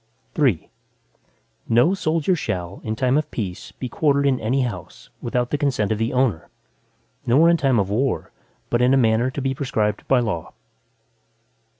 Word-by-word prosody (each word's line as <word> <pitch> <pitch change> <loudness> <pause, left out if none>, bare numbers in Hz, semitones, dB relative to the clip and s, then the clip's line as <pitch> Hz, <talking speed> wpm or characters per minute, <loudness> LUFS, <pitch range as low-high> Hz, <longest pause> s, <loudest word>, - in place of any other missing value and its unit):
III 130 - +1 1.0
No 120 +11 +4
soldier 165 -1 +1
shall, 95 - -4
in 110 0 -3
time 130 +4 +2
of 155 0 -5
peace 95 -6 -5
be 130 - -6
quartered 140 +2 +1
in 135 -2 +2
any 125 +5 0
house, 100 -8 -7
without 120 +1 -1
the 145 - 0
consent 125 -8 0
of 110 - -1
the 115 +1 0
owner, 125 -10 0 0.8
nor 140 +8 +5
in - - +4
time 135 -5 +2
of 100 -2 0
war, 125 +4 -1 0.4
but 120 - +2
in 125 +2 +4
a - - +4
manner 115 0 +3
to 130 +1 -5
be 135 0 0
prescribed 110 -6 -2
by 130 - +4
law. 105 -9 -3
125 Hz, 170 wpm, -22 LUFS, 110-140 Hz, 1.0 s, nor